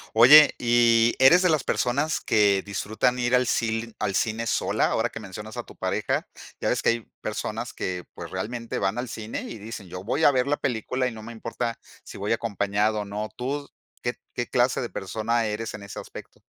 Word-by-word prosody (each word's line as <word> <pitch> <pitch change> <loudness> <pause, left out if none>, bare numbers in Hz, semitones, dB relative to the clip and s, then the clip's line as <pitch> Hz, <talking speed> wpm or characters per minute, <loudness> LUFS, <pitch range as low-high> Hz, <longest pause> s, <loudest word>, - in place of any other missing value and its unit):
Oye, 145 +7 +9
¿y 120 -1 +4
eres 150 +8 +7
de 185 - +4
las 155 -5 +2
personas 145 +6 0
que 100 -3 +3
disfrutan 110 +5 -1
ir 120 0 0
al 125 -1 +4
cil 115 -1 -1
al 105 -2 -1
cine 115 +3 0
sola? - - +1
Ahora 115 - +1
que 115 - -8
mencionas 105 +2 -8
a - - -4
tu - - -16
pareja, - - -1 0.3
ya - - -2
ves - - +1
que - - +3
hay 115 0 +1 0.2
personas - - -4
que, 90 -1 -4
pues, - - -8
realmente 115 +1 -4
van 100 +3 0
al 125 +1 -2
cine 110 -1 -5
y - - -7
dicen: 105 -2 -8
"Yo 90 +1 -7
voy 145 +9 +1
a - - +8
ver 130 -1 +1
la 145 +1 +1
película 125 0 -1
y 125 - -4
no 110 -1 -9
me 115 - -8
importa 115 +1 -4 0.2
si - - -10
voy 100 +3 0
acompañado 105 -1 0
o - - -5
no". 105 +2 -4
¿Tú 140 +3 -3 0.3
qué 120 - -1 0.2
qué 120 - -3
clase 125 0 +2
de 120 - -3
persona 110 +4 -1
eres 110 +1 -3
en 100 - -9
ese 100 - -8
aspecto? - - -12
115 Hz, 210 wpm, -25 LUFS, 105-125 Hz, 0.3 s, Oye